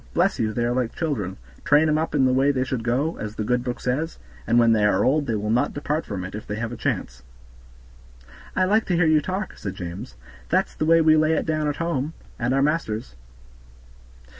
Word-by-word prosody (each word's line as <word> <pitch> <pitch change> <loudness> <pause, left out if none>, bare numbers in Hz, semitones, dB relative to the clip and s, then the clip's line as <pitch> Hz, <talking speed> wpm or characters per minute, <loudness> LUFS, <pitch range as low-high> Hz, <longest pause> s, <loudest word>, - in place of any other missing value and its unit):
Bless 185 +3 +2
you! 110 -1 +1
they 120 +2 -1
are 120 - 0
like 125 -2 -1
children, 115 - -2 0.3
train 150 +2 +4
'em 155 0 +2
up 160 -1 -2
in 135 -2 +4
the 130 - +3
way 135 +2 +3
they 130 -2 +1
should 130 -3 -3
go, 130 +8 0
as 105 0 -5
the 110 - -2
good 125 +2 0
book 125 -1 -4
says, 145 +7 -2 0.3
and 115 - +3
when 115 -1 +5
they 110 -2 +2
are 105 -2 +3
old 145 +2 +2
they 115 - 0
will 105 +1 -2
not 120 +2 +1
depart 150 +2 -2
from 95 -3 -4
it, 90 - -7
if 105 - -7
they 105 - -3
have 115 +1 -3
a - - -5
chance." 65 - -3 1.3
"I 185 - +3
like 215 +4 +2
to 180 - +1
hear 175 0 +3
you 155 -1 +4
talk," 185 +6 -4
said 100 -2 -5
James, 85 -8 -7 0.3
"that's - - +1
the 155 - -2
way 165 0 +6
we 155 -1 +5
lay 155 +1 +3
it - - 0
down 155 -1 0
at 145 - -1
home, 165 -2 -2 0.3
at 120 +1 0
our 135 +1 +3
master's." 135 -7 -1
130 Hz, 235 wpm, -24 LUFS, 110-155 Hz, 1.3 s, way